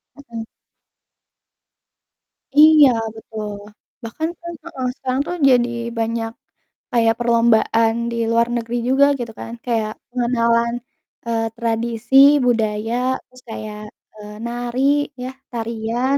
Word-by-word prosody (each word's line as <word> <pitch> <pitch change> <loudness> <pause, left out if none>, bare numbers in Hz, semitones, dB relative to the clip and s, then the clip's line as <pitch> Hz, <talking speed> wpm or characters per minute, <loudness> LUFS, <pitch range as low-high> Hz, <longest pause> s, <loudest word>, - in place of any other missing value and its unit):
Mhm. 235 -5 -8 2.1
Iya, 305 -2 +8 0.3
betul. 215 -1 -7 0.5
Bahkan, 315 +8 -3
kan 340 0 -7
heeh, 255 -1 -4
sekarang 260 0 -2
tuh 355 - -3
jadi 245 -1 +4 0.3
banyak 225 0 -1 0.6
kayak 230 -2 +3
perlombaan 230 -1 +3 0.2
di - - -3
luar 230 +1 +3
negeri 235 0 -3
juga 275 +2 +5
gitu, 230 -2 -4
kan, 230 - -7
kayak 225 -3 0 0.2
pengenalan, 235 -1 +1 0.5
eee, 230 -1 -1
tradisi, 235 +1 -2 0.3
budaya, 220 -1 0 0.3
terus 255 0 -19
kayak, 215 -1 -6 0.3
eee, 210 -1 -11
nari 240 +1 -3 0.4
ya 255 - -4 0.2
tarian, 235 +3 -1
235 Hz, 110 wpm, -20 LUFS, 225-250 Hz, 2.1 s, Iya